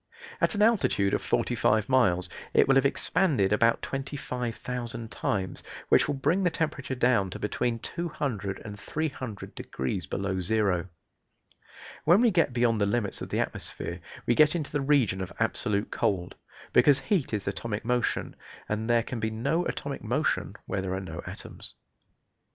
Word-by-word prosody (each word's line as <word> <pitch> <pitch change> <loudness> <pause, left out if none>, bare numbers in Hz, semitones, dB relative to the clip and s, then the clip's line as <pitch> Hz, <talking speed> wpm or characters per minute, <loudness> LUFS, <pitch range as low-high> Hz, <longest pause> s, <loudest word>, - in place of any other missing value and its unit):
At - - +2
an 205 - +3
altitude 200 - +3
of - - +1
forty - - 0
five 110 -1 +2
miles 95 -9 +3 0.3
it - - +6
will 135 - +5
have 135 0 +5
expanded 135 - +1
about 115 +2 +3
25,000 125 -4 -4
times, 95 -3 -2 0.3
which - - +5
will 145 - 0
bring 155 +8 +1
the 180 - +3
temperature 145 -5 -2
down 120 -6 +3
to - - -6
between 115 +2 -1
200 125 - -3
and 105 -1 -7
300 130 - -4
degrees 65 0 -4
below 95 -1 -2
zero. 95 -2 +1 1.2
When 175 +4 +6
we 235 -1 +5
get 170 -7 +3
beyond 120 -3 +2
the 100 - +3
limits 105 -1 -1
of - - -5
the - - -1
atmosphere - - -4 0.3
we 120 - +3
get 150 +5 +5
into 155 -4 -3
the 145 - 0
region 135 -9 +2
of 95 - -5
absolute 110 -2 +1
cold, 90 -3 0 0.4
because 135 +2 +5
heat 190 - 0
is 105 -3 -2
atomic 105 +2 -3
motion, 125 0 0 0.3
and 110 +2 -2
there 120 -1 +4
can 120 0 -5
be 110 0 0
no 140 +11 0
atomic 140 -1 -4
motion 130 +7 0
where 95 - -2
there 95 0 -2
are - - -2
no 85 -3 -6
atoms. - - -8
120 Hz, 165 wpm, -28 LUFS, 100-140 Hz, 1.2 s, it